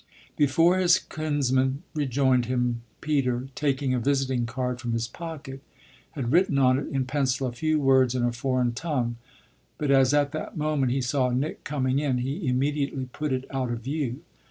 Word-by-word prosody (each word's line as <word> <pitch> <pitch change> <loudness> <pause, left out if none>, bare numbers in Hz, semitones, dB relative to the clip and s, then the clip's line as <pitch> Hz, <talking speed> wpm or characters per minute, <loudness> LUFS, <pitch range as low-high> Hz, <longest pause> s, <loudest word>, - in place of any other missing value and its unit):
Before 165 +6 +3
his 175 -2 +5
kinsman 140 -2 -1
rejoined 130 -4 +2
him 125 -2 0 0.2
Peter, 135 -4 0
taking 135 -2 0
a 125 - +1
visiting 130 -2 0
card 125 +1 -3
from 120 -1 -2
his 115 0 -1
pocket, 145 -1 -8 0.5
had 130 -6 -3
written 170 -3 +3
on 130 -1 +4
it 140 - -5
in 135 -1 -1
pencil 135 -1 0
a 125 - -2
few 155 +6 0
words 130 -3 +4
in 125 - 0
a 120 - +2
foreign 125 0 0
tongue; 125 -4 -2 0.6
but 145 -2 0
as 135 -1 +5
at 145 -1 +2
that 155 +2 -5
moment 150 -4 +1
he 135 +1 0
saw 125 +1 +1
Nick 130 +5 -2
coming 135 -2 0
in 140 -4 0
he 135 +7 -3
immediately 135 0 -1
put 150 -1 -3
it 130 0 -1
out 130 -2 -2
of 120 -1 -3
view. 135 -1 -3
135 Hz, 180 wpm, -26 LUFS, 125-145 Hz, 0.6 s, his